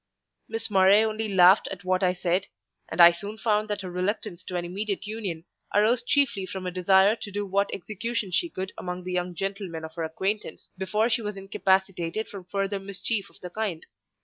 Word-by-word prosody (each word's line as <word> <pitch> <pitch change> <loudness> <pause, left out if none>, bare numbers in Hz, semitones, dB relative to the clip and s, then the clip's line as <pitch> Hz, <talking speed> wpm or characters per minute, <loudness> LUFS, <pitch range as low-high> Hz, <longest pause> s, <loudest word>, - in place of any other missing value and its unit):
Miss 225 0 -4
Murray 195 +2 +6
only 220 -1 -2
laughed 185 +1 +6
at 190 -1 -7
what 185 +1 +1
I 180 -1 +2
said; 180 +2 0 0.4
and 160 - -6
I 170 0 +10
soon 200 +5 -7
found 215 -1 +1
that 205 -1 -2
her 185 -2 -6
reluctance 185 0 -2
to 180 - -6
an 175 -1 -1
immediate 200 +3 -3
union 200 -6 -4 0.3
arose 220 +4 +4
chiefly 240 -8 +1
from 190 -1 -6
a 180 - -2
desire 190 +3 +4
to 205 - -7
do 205 +1 -2
what 200 +1 +1
execution 215 +1 -3
she 340 - +1
could 190 -9 -5
among 180 0 -5
the 180 0 -4
young 180 0 -2
gentlemen 195 -3 -4
of 160 - -10
her 165 0 -4
acquaintance, 190 +6 -3
before 210 +5 0
she 225 +1 +2
was 210 -2 -4
incapacitated 190 0 0
from 195 -3 -9
further 195 +1 -2
mischief 200 +2 -2
of - - -18
the 180 - -7
kind. 200 -7 -3
195 Hz, 200 wpm, -26 LUFS, 180-210 Hz, 0.4 s, I